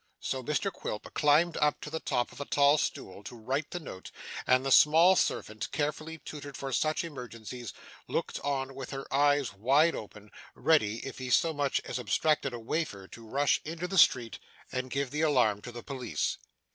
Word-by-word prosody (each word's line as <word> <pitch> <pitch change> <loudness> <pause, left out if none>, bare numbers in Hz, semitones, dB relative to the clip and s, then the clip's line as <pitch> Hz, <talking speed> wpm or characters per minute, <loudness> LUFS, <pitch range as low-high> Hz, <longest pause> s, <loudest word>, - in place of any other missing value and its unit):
So 130 - -3
Mr 150 +8 -1
Quilp 105 - -6
climbed 155 +3 +3
up 150 -1 +2
to 150 - -7
the 160 - -2
top 120 -5 -1
of - - -9
a - - -3
tall 145 +2 +4
stool 95 +2 -4
to 120 - -9
write 135 +7 -2
the 175 - -4
note, 95 - -9 0.4
and 130 +1 +4
the 135 - 0
small 165 +7 +7
servant, 110 -10 -1
carefully 155 +2 -2
tutored 145 -3 -8
for 135 -1 -4
such 155 +5 +1
emergencies, 125 - -7 0.4
looked - - -2
on 135 -1 -2
with 135 -1 -7
her 135 -1 -5
eyes 145 -1 +3
wide 140 +11 +3
open, 105 0 -9 0.2
ready, 115 -9 +2
if 135 - -7
he 130 -1 -5
so 160 +6 +3
much 145 -2 0
as - - -3
abstracted 135 +5 +1
a 120 - -6
wafer, 115 - -3
to 115 -1 -12
rush 140 +4 +2
into 165 +3 -4
the 190 0 +2
street 120 -6 +4 0.3
and 130 0 -3
give 140 0 -2
the 150 +1 -2
alarm 125 -10 +3
to 120 - -8
the 120 0 -9
police. 125 - -3
135 Hz, 190 wpm, -30 LUFS, 120-150 Hz, 0.4 s, small